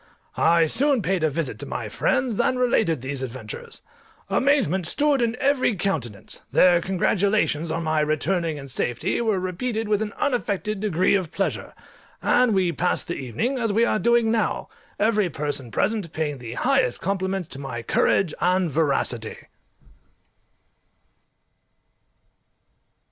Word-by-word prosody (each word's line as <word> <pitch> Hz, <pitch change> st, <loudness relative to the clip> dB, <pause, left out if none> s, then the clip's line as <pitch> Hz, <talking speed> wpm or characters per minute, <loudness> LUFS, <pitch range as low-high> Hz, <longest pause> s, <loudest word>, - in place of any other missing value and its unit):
I 165 Hz, 0 st, +4 dB
soon 265 Hz, -, +2 dB
paid 185 Hz, 0 st, 0 dB
a 155 Hz, -, +3 dB
visit 140 Hz, -7 st, -3 dB
to -, -, -6 dB
my 115 Hz, -, -4 dB
friends, 250 Hz, -, 0 dB
and 255 Hz, -, +1 dB
related 220 Hz, -, +1 dB
these 135 Hz, +1 st, -4 dB
adventures. 455 Hz, -, -7 dB, 0.5 s
Amazement 235 Hz, -, +2 dB
stood 285 Hz, -, +2 dB
in 235 Hz, 0 st, +1 dB
every 270 Hz, -5 st, +2 dB
countenance; 140 Hz, -, -3 dB
their 175 Hz, -2 st, +5 dB
congratulations 190 Hz, -3 st, +1 dB
on 165 Hz, +1 st, -2 dB
my 155 Hz, -1 st, +1 dB
returning 155 Hz, +2 st, 0 dB
in 140 Hz, -1 st, -8 dB
safety 130 Hz, -, -1 dB
were 220 Hz, -5 st, +1 dB
repeated 220 Hz, +5 st, -3 dB
with 210 Hz, 0 st, +1 dB
an 210 Hz, -1 st, -3 dB
unaffected 215 Hz, -6 st, -1 dB
degree 185 Hz, -3 st, +1 dB
of 185 Hz, -5 st, 0 dB
pleasure, 195 Hz, -, -3 dB, 0.4 s
and 245 Hz, -4 st, +3 dB
we 185 Hz, -2 st, +2 dB
passed 180 Hz, +1 st, 0 dB
the 175 Hz, -, -2 dB
evening 140 Hz, -, -2 dB
as 230 Hz, -3 st, 0 dB
we 225 Hz, +3 st, +3 dB
are 215 Hz, -, +1 dB
doing 235 Hz, +2 st, +3 dB
now, 225 Hz, -1 st, -1 dB, 0.3 s
every 210 Hz, -3 st, +2 dB
person 145 Hz, -4 st, -3 dB
present 205 Hz, -, -1 dB
paying 150 Hz, -3 st, -3 dB
the 120 Hz, -1 st, -7 dB
highest 120 Hz, 0 st, +1 dB
compliments 190 Hz, -1 st, -2 dB
to 135 Hz, -, -8 dB
my 125 Hz, -4 st, -5 dB
COURAGE 180 Hz, +5 st, +2 dB
and 180 Hz, -2 st, +2 dB
VERACITY. 135 Hz, -6 st, 0 dB
185 Hz, 140 wpm, -24 LUFS, 155-220 Hz, 0.5 s, their